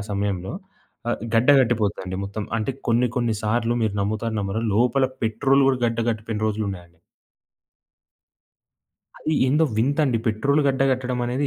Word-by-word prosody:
సమయంలో 100 -2 -2 0.6
ఆహ్, - - -2
గడ్డ 115 +4 +3
కట్టిపోతదండి 105 -6 -1
మొత్తం 100 +2 -5
అంటే 115 +4 -1 0.2
కొన్ని 120 +2 +3
కొన్ని 120 -2 +1
సార్లు 115 +2 0
మీరు 110 -2 0
నమ్ముతారో, 110 +3 -2
నమ్మరో 100 +2 -2
లోపల 125 +4 +3 0.2
పెట్రోలు 135 +5 +2
గూడా 130 - +1
గడ్డ 115 0 -2
కట్టిపోయిన 110 -1 -4
రోజులున్నాయండి. 95 -6 -4 2.2
అది 155 - -1
ఏందో 150 +5 +3
వింతండి 135 +1 +2
పెట్రోలు 140 +7 +2
గడ్డ 135 0 +1
కట్టడం 125 -1 -2
అనేది 125 +4 -1
115 Hz, 130 wpm, -23 LUFS, 105-130 Hz, 2.2 s, గడ్డ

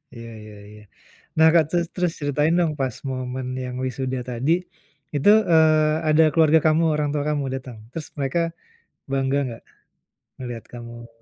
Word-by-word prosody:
Iya 115 0 -9
iya 105 -1 -12
iya. 105 0 -14 0.5
Nah 160 0 +7
Kak, 165 -2 +6
terus 170 -1 0
terus 180 -2 0
ceritain 150 +3 +1
dong 165 -3 +1
pas 130 -3 -1 0.2
momen 130 0 -4
yang 125 -1 -5
wisuda 130 0 -3
tadi, 125 +6 0 0.6
itu, 145 +8 +3 0.2
eee, 155 -1 +4
ada 155 +1 +5
keluarga 160 0 +5
kamu, 160 +2 +3
orang 150 -1 0
tua 145 -1 -1
kamu 150 -2 0
datang? 125 -3 -8
Terus 160 0 -6
mereka 140 +5 0 0.7
bangga 135 +1 +1
enggak 115 -2 -8 0.8
melihat 120 -3 -6
kamu 120 -1 -9
135 Hz, 155 wpm, -23 LUFS, 125-155 Hz, 0.8 s, Nah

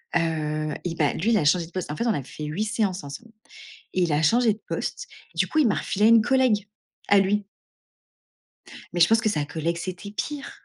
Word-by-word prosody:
heu, 155 -2 -1
et 170 -2 -3
bah 150 -3 +1
lui, 220 +8 0
il 220 - +4
a 150 - +1
changé 165 +2 +3
de - - -18
poste. 180 -4 -4
En - - -4
fait, 235 - -2
on 225 - +3
a 140 - -3
fait 150 +3 -8
8 175 +9 -2
séances 200 -6 -1
ensemble 145 +11 -9 0.6
et 185 - +2
il 165 -3 +1
a 150 +2 +2
changé 230 +6 +3
de 220 - -20
poste. - - -4 0.3
Du - - +1
coup, 315 - -2
il 275 -7 +5
m'a - - +1
refilé 210 +2 +1
une 230 -1 +7
collègue 240 -6 +2 0.4
à 200 - +6
lui 200 +1 +1 1.5
mais 175 - -2
je 170 - +7
pense 225 +1 +3
que 215 - +1
sa 150 -7 -1
collègue, 165 +3 -2
c'était 185 +3 -6
pire! 285 +6 -5
185 Hz, 225 wpm, -25 LUFS, 160-215 Hz, 1.5 s, une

